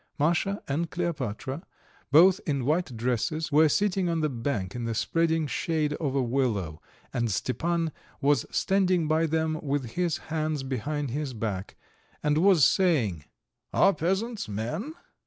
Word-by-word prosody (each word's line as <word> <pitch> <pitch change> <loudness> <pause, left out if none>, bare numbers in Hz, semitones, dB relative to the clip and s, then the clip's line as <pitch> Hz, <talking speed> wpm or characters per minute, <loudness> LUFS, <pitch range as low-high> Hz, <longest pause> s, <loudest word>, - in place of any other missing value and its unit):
Masha 175 +7 +1
and 160 +4 -1
Kleopatra, 145 -5 -3 0.5
both 180 +6 +7
in 140 -5 0
white 155 -4 0
dresses, 125 +7 -1
were 155 +2 +5
sitting 190 0 +1
on 165 -1 0
the 155 - +1
bank 115 -7 -3
in 120 -1 -4
the 115 -1 -2
spreading 165 +5 +1
shade 155 0 -1
of 145 -3 -2
a 135 - +2
willow, 115 - -1 0.3
and 120 -2 0
Stepan 165 - -1 0.3
was 145 -3 +2
standing 185 -4 +2
by 160 +1 +2
them 160 0 0
with 140 -5 -2
his 175 0 0 0.2
hands 155 -3 -1
behind 135 +2 -3
his 140 -1 -3
back, 105 -4 -4 0.5
and 150 0 +2
was 180 -6 +6
saying: 125 - +2 0.5
"Are 195 - +5
peasants 195 - -2
men? 155 - -4
150 Hz, 145 wpm, -27 LUFS, 125-170 Hz, 0.5 s, both